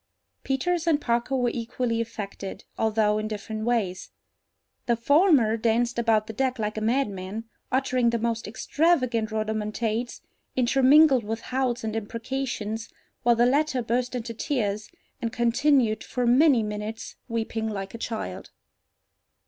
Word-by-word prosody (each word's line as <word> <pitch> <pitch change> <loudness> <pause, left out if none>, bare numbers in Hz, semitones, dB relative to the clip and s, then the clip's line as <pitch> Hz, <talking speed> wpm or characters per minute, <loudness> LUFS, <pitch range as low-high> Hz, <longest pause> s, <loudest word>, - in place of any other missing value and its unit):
Peters 335 +6 0
and 310 -3 +4
Parker 240 0 0
were 245 -2 +1
equally 230 0 -2
affected, 200 -3 -6
although 215 -1 +2
in 215 - -3
different 215 +1 -5
ways. 215 -7 -1 0.8
The 235 - +3
former 275 - +4
danced 235 +2 +1
about 225 -2 +2
the 225 - -7
deck 260 +2 0
like 215 -1 -2
a 215 - -3
madman, 215 -4 -1 0.3
uttering 255 -2 +2
the 235 - 0
most 230 0 -2
extravagant 255 -1 +1
rhodomontades, 220 +2 -2 0.3
intermingled 265 +1 +5
with 225 +2 -4
howls 255 -2 -1
and 220 0 -3
imprecations, 225 0 -4 0.3
while 240 0 +4
the 235 +1 +4
latter 270 -1 +2
burst 245 +2 -1
into 235 -1 -4
tears, 215 -5 -2 0.3
and 230 - -2
continued 240 -1 +2
for 250 -1 -2
many 255 0 +5
minutes 210 +1 -5
weeping 225 -1 -2
like 195 -2 -5
a 230 - -7
child. 95 - -5
230 Hz, 135 wpm, -26 LUFS, 220-255 Hz, 0.8 s, intermingled